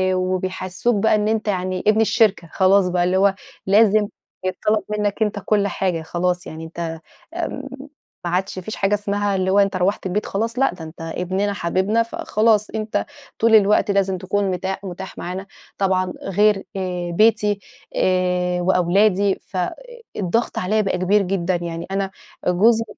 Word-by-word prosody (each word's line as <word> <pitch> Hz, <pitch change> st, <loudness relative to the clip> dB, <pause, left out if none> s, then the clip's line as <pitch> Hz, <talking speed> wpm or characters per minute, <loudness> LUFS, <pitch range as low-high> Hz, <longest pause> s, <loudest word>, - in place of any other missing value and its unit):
وبيحسّسوك 185 Hz, +4 st, -1 dB
بقى 215 Hz, +2 st, +3 dB
إن 210 Hz, 0 st, +1 dB
أنت 220 Hz, 0 st, 0 dB
يعني 185 Hz, -2 st, -1 dB
ابن 215 Hz, +1 st, +5 dB
الشركة، 215 Hz, -7 st, +2 dB
خلاص 190 Hz, 0 st, +4 dB
بقى، 180 Hz, 0 st, +1 dB
اللي 180 Hz, +1 st, +2 dB
هو 195 Hz, 0 st, +3 dB, 0.3 s
لازم 210 Hz, +1 st, +5 dB, 0.4 s
يتْطلب 210 Hz, +3 st, 0 dB
منك 210 Hz, 0 st, -1 dB
أنت 210 Hz, -1 st, +1 dB
كل 205 Hz, -2 st, +2 dB
حاجة، 180 Hz, -3 st, -1 dB
خلاص 180 Hz, +3 st, -2 dB
يعني 160 Hz, +1 st, -7 dB
أنت 165 Hz, 0 st, -5 dB, 0.3 s
آمم، 335 Hz, -6 st, -4 dB, 0.6 s
ما 175 Hz, -, -1 dB
عادش 190 Hz, +2 st, -1 dB
ما 185 Hz, -, -5 dB
فيش 220 Hz, -, -5 dB
حاجة 195 Hz, +1 st, +1 dB
اسمها 205 Hz, 0 st, -1 dB
اللي 190 Hz, 0 st, 0 dB
هو 200 Hz, -, +4 dB
أنت 195 Hz, -1 st, +2 dB
رُوحت 185 Hz, +2 st, 0 dB
البيت 200 Hz, +3 st, -1 dB
خلاص، 230 Hz, +5 st, -2 dB
لأ 270 Hz, -, +3 dB
ده 180 Hz, -2 st, -10 dB
أنت 160 Hz, +1 st, -11 dB
ابننا 185 Hz, +5 st, -2 dB
حبيبنا، 195 Hz, +5 st, +1 dB
فخلاص، 215 Hz, -1 st, +1 dB
أنت 215 Hz, -1 st, -2 dB, 0.3 s
طول 225 Hz, 0 st, +5 dB
الوقت 205 Hz, 0 st, +4 dB
لازم 195 Hz, -1 st, +1 dB
تكون 190 Hz, +1 st, -1 dB
متاح 190 Hz, +2 st, -3 dB
متاح 190 Hz, 0 st, -7 dB
معانا، 185 Hz, +2 st, -5 dB, 0.3 s
طبعًا 185 Hz, -2 st, +1 dB
غير 200 Hz, +1 st, +2 dB
آآ 180 Hz, -2 st, -3 dB
بيتي 210 Hz, +1 st, +3 dB, 0.4 s
آآ 180 Hz, -1 st, +1 dB
وأولادي، 190 Hz, +2 st, +3 dB
فالضغط 230 Hz, -, -3 dB
عليَّ 215 Hz, +4 st, +1 dB
بقى 195 Hz, -2 st, 0 dB
كبير 195 Hz, +3 st, +3 dB
جدًا. 185 Hz, -1 st, 0 dB
يعني 170 Hz, -1 st, -4 dB
أنا 195 Hz, 0 st, -1 dB, 0.4 s
جوزي 220 Hz, +6 st, +4 dB
195 Hz, 160 wpm, -21 LUFS, 180-210 Hz, 0.6 s, ابن